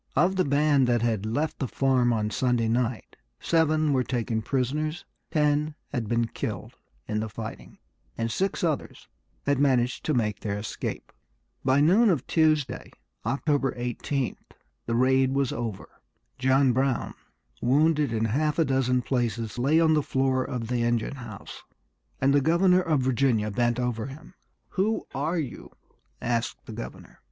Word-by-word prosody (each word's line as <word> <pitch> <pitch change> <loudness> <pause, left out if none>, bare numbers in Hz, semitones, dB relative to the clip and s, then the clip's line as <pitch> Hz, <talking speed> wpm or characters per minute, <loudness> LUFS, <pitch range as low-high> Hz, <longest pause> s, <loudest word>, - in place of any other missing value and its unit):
Of 185 +2 +3
the 185 - +3
band 140 -1 +3
that 120 -2 +2
had 110 -3 0
left 145 +8 -1
the 135 - -1
farm 130 -1 +2
on 105 -2 0
Sunday 120 -2 +1
night 120 0 -1 0.2
seven 155 -2 +2
were 130 -1 +2
taken 115 -2 -1
prisoners, 145 +7 -2 0.2
ten 150 -1 +1
had 120 -6 -3
been 115 0 +2
killed 115 - -5 0.3
in 105 - -1
the 110 0 -3
fighting, 110 +1 -8 0.4
and 115 0 -1
six 190 - -1
others 160 -4 -2 0.4
had 140 -1 +2
managed 125 -3 +2
to 155 - +1
make 105 -4 0
their 100 -1 -3
escape. 105 +2 -5 0.5
By 130 +2 +3
noon 200 +9 +5
of 160 -9 +1
Tuesday, 155 -4 +1 0.4
October 140 +2 +1
18th, 125 +2 -2 0.5
the 115 - 0
raid 130 +1 +3
was 135 -2 +1
over. 115 -5 -4 0.5
John 130 0 +3
Brown, 130 -1 0 0.5
wounded 150 +2 +3
in 115 -1 0
half 145 +7 0
a 165 - +3
dozen 130 -2 +1
places, 115 -3 -2
lay 145 +6 +3
on 160 -1 +4
the 150 - +3
floor 130 -1 +1
of 120 -3 -4
the 120 0 0
engine 120 +3 0
house; 110 -6 -9 0.6
and 135 +1 +3
the 145 - +4
governor 180 +5 +4
of 155 -6 +1
Virginia 125 -4 +1
bent 120 +3 +1
over 125 -2 -2
him. 155 +6 -11 0.4
"Who 215 +4 0
are 155 +6 -1
you?" 145 -7 -5 0.5
asked 120 -1 -2
the - - -8
governor. 60 - -9
130 Hz, 155 wpm, -26 LUFS, 120-150 Hz, 0.6 s, noon